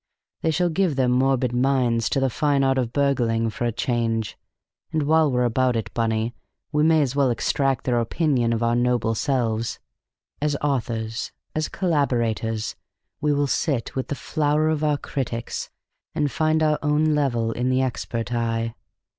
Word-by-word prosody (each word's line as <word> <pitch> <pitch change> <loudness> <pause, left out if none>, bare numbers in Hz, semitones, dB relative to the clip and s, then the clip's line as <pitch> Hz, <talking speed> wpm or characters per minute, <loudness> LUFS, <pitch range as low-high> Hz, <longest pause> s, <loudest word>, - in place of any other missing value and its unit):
They 160 - +1
shall 175 +2 +1
give 170 -2 +1
their 130 -1 +2
morbid 125 0 +2
minds 125 -3 +2
to - - +1
the 135 -1 +1
fine 145 +1 +1
art 135 0 +2
of 120 -2 -1
burgling, 120 -5 +1
for 120 - -3
a 120 - +1
change; 115 -3 -1 0.6
and 155 -2 0
while 155 0 +3
we're 125 0 +2
about 125 +1 +2
it, 115 - -3
Bunny, 115 0 0 0.4
we 150 0 +1
may 160 0 +4
as 135 -1 -2
well 140 -2 +3
extract 135 +2 0
their 120 -2 +1
opinion 120 -1 +1
of 115 0 0
our 115 0 +2
noble 120 -2 +1
selves. 115 -3 -1 0.6
As 150 -1 +1
authors, 115 -5 -2 0.2
as 155 0 -1
collaborators, 120 - 0 0.5
we 150 - +2
will 145 0 +2
sit 140 -3 -1
with 130 - -2
the 145 - -3
flower 150 +1 +1
of 155 -1 0
our 150 -1 +2
critics, 120 -5 -4 0.5
and 150 -3 0
find 155 +4 +1
our 155 -1 +2
own 150 +1 +2
level 120 -6 +1
in 125 +2 -1
the 130 +1 +2
expert 120 -2 -3
eye. 115 -1 -1
130 Hz, 170 wpm, -23 LUFS, 115-150 Hz, 0.6 s, may